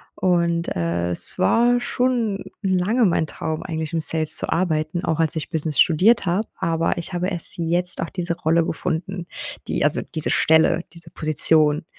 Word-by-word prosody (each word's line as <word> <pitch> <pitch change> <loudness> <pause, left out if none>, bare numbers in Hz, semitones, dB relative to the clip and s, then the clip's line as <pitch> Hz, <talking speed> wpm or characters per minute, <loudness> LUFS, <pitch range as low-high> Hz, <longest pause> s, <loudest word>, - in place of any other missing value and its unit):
und, 170 -2 0
äh, 85 0 -2
es 85 - +3
war 240 - +3
schon 235 -7 -1 0.2
lange 195 +5 +1
mein 165 -3 +1
Traum 160 +1 -5
eigentlich, 160 -3 -5
im 165 - 0
Sales 155 -1 +1
zu - - -2
arbeiten, 165 -1 -1
auch 160 0 -1
als 160 0 +1
ich 155 - -4
Business 155 -2 0
studiert 195 +8 +3
habe, 190 +5 -1
aber 165 0 -1
ich 170 - -5
habe 180 +1 -1
erst 175 -3 0
jetzt 175 +1 +2
auch 165 - -3
diese 170 -2 -3
Rolle 165 +1 +1
gefunden, 180 +2 -4 0.4
die - - -1
also, - - +1
diese 155 -2 -3
Stelle, 160 +2 +3
diese 170 -1 -11
Position, 155 -1 +2
170 Hz, 170 wpm, -21 LUFS, 160-180 Hz, 0.4 s, es